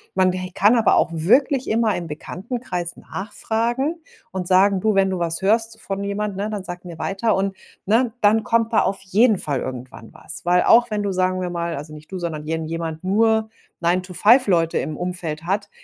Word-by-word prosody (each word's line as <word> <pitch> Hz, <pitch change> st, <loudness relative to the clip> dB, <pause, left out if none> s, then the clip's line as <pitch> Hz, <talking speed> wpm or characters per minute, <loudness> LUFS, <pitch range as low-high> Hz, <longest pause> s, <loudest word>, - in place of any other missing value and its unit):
Man 185 Hz, -1 st, +3 dB
he 185 Hz, 0 st, -5 dB
kann 205 Hz, +5 st, +4 dB
aber 230 Hz, -2 st, +4 dB
auch -, -, +2 dB
wirklich 250 Hz, -, +2 dB
immer 220 Hz, -2 st, +2 dB
im 175 Hz, -1 st, -4 dB
Bekanntenkreis 180 Hz, -, -5 dB
nachfragen 230 Hz, -, -2 dB, 0.4 s
und 185 Hz, -2 st, -4 dB
sagen: 190 Hz, +1 st, +4 dB
„Du, 215 Hz, -2 st, +2 dB
wenn 195 Hz, 0 st, +3 dB
du 185 Hz, -, -2 dB
was 170 Hz, 0 st, -2 dB
hörst 225 Hz, +3 st, +1 dB
von 195 Hz, 0 st, -4 dB
jemand, 200 Hz, 0 st, -3 dB
ne, 205 Hz, +2 st, -3 dB
dann 205 Hz, -3 st, -5 dB
sag 175 Hz, 0 st, -7 dB
mir 175 Hz, -2 st, -10 dB
weiter 205 Hz, +3 st, 0 dB
und“, 195 Hz, 0 st, -1 dB, 0.3 s
ne? 230 Hz, +3 st, +2 dB
Dann 215 Hz, +1 st, +3 dB
kommt 230 Hz, 0 st, +1 dB
da -, -, +5 dB
auf 195 Hz, -, -1 dB
jeden 205 Hz, +3 st, +3 dB
Fall 140 Hz, -6 st, -2 dB
irgendwann 125 Hz, -3 st, -7 dB
was. 165 Hz, -, -11 dB
Weil 180 Hz, +1 st, +3 dB
auch 240 Hz, +1 st, +5 dB
wenn 210 Hz, -1 st, -2 dB
du, 200 Hz, -, -1 dB
sagen 185 Hz, 0 st, 0 dB
wir 180 Hz, -1 st, -3 dB
mal, 170 Hz, -1 st, -3 dB
also, 150 Hz, +2 st, -8 dB
nicht 155 Hz, +4 st, -13 dB
du, 190 Hz, -, -4 dB
sondern 160 Hz, -4 st, -5 dB
irgendjemand, 160 Hz, +1 st, -4 dB
nur 220 Hz, +3 st, +2 dB, 0.3 s
9 175 Hz, +2 st, +1 dB
to 180 Hz, 0 st, -11 dB
5 240 Hz, +4 st, +5 dB
Leute 165 Hz, -4 st, +2 dB
im 155 Hz, -1 st, -4 dB
Umfeld 175 Hz, -3 st, -4 dB
hat, 200 Hz, +3 st, -2 dB
190 Hz, 205 wpm, -21 LUFS, 170-220 Hz, 0.4 s, da